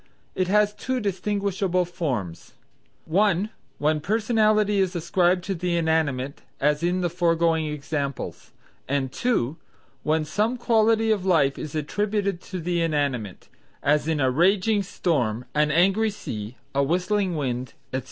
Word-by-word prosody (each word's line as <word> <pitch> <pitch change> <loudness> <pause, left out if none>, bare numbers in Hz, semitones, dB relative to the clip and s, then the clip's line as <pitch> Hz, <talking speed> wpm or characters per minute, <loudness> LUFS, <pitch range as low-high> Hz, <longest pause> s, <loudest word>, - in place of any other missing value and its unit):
It 185 - 0
has 210 +1 +3
two 255 +4 -2
distinguishable 195 -2 0
forms: 130 - -4 0.5
(1) 200 +3 +2 0.3
when 150 +1 +1
personality 215 +1 +2
is 190 -1 +1
ascribed 175 +1 +2
to 195 - -2
the 175 -1 -1
inanimate 150 -5 0 0.2
as 150 +2 +2
in 175 +2 +1
the 175 - +1
foregoing 165 -2 +1
examples, 145 -2 -4 0.4
and 135 -1 -1
(2) 160 - 0 0.4
when 155 0 +1
some 215 +9 0
quality 225 -1 +3
of 205 -4 +1
life 160 -7 +2
is 155 0 -6
attributed 200 +4 -1
to 185 - -6
the 175 0 -1
inanimate; 140 - -1 0.4
as, 150 +1 +2
a 145 -5 +2
raging 195 - +3
storm; 125 - -1
an 150 0 +2
angry 195 +8 +3
sea; 110 - -6 0.2
a 140 - +2
whistling 180 +5 +1
wind, 125 -4 -3 0.2
etc. 130 - +1
175 Hz, 135 wpm, -25 LUFS, 150-200 Hz, 0.5 s, has